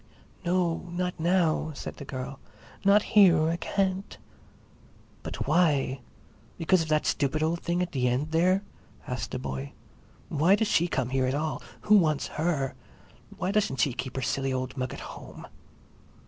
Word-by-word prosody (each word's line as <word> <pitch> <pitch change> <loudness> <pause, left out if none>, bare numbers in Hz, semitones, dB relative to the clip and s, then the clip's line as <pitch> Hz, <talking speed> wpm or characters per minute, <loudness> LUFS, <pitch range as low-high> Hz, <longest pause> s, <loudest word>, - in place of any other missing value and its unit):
"No, 175 -1 0
not 180 0 -2
now," 165 -2 +2
said - - -7
the 140 - -8
girl. 135 0 -6 0.4
"Not 200 +1 +5
here, 175 -7 +6
I 170 - 0
can't." 190 +2 -1 1.0
"But - - -5
why? 145 -5 +2 0.6
Because 170 +2 +3
of 160 - -3
that 155 -1 +1
stupid 150 +2 +1
old 165 +2 0
thing 175 +1 0
at 180 - -5
the 125 -3 +1
end 130 +6 0
there?" 185 +4 +3 0.4
asked - - -4
the - - -3
boy. 65 0 -5 0.5
"Why 165 +6 +4
does 220 +1 0
she 170 -2 +3
come 130 -7 -1
here 130 0 +1
at 130 - 0
all—who 160 +7 0
wants 155 -5 +1
her? 150 -6 0 0.6
Why 185 - -1
doesn't 205 -10 0
she 135 - +2
keep 130 +1 -5
her 135 - -2
silly 135 +2 -1
old 130 0 -3
mug 130 -2 -3
at - - -7
home?" - - -10
160 Hz, 160 wpm, -28 LUFS, 135-180 Hz, 1.0 s, here